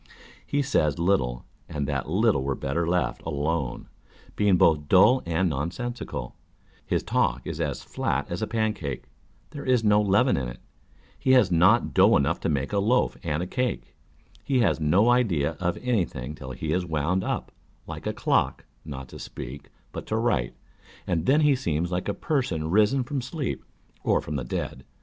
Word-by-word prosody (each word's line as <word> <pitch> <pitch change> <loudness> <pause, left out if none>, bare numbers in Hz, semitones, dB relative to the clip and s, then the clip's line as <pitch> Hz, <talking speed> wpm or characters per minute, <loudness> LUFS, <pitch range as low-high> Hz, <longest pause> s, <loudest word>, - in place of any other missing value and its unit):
He 145 0 0
says 75 - +1
little, 65 -10 0 0.2
and 75 -1 -2
that 70 -1 -2
little 100 - +2
were 70 0 -1
better 80 +7 -2
left 90 +1 0
alone, 75 -3 -2 0.5
being 100 -3 +3
both 75 -3 +3
dull 105 +8 +6
and 85 +3 +1
nonsensical; 85 - -4 0.5
his - - -1
talk - - 0
is - - -4
as - - -2
flat 70 +2 -2
as 85 - -3
a 110 - -1
pancake, 105 - -2 0.5
there 145 - -7
is 125 -3 +2
no 105 -1 +4
leaven 105 +6 +3
in 65 -2 -2
it, - - -10 0.6
he 130 - +3
has 125 -7 +5
not 90 +8 +4
dough 100 +4 +6
enough 75 +4 0
to - - -1
make 70 +3 -1
a 100 - +2
loaf 120 +5 +2
and 80 0 -2
a - - -3
cake; 125 +6 -3 0.5
he 130 -3 +1
has 110 - +2
no 90 +10 +4
idea 100 - +1
of 90 -1 -1
any 120 -6 +2
thing 65 0 -7
till 70 -3 -9
he' 75 +5 -3
is 90 +1 +1
wound 85 +3 -1
up, - - -3 0.3
like - - -7
a - - -1
clock, - - 0 0.2
not 65 -4 -7
to - - -10
speak, 70 +4 -8 0.2
but - - -7
to 110 - -1
write, 65 - 0 0.5
and 85 -2 -1
then 145 +4 +5
he 150 -2 +4
seems 85 - -1
like 90 0 -2
a 100 - -1
person 90 - -1
risen 110 +7 +3
from 135 +2 -3
sleep 140 +2 -4 0.4
or - - +3
from 75 - -5
the 65 - -2
dead. 65 +2 -4
90 Hz, 180 wpm, -26 LUFS, 75-115 Hz, 0.6 s, dull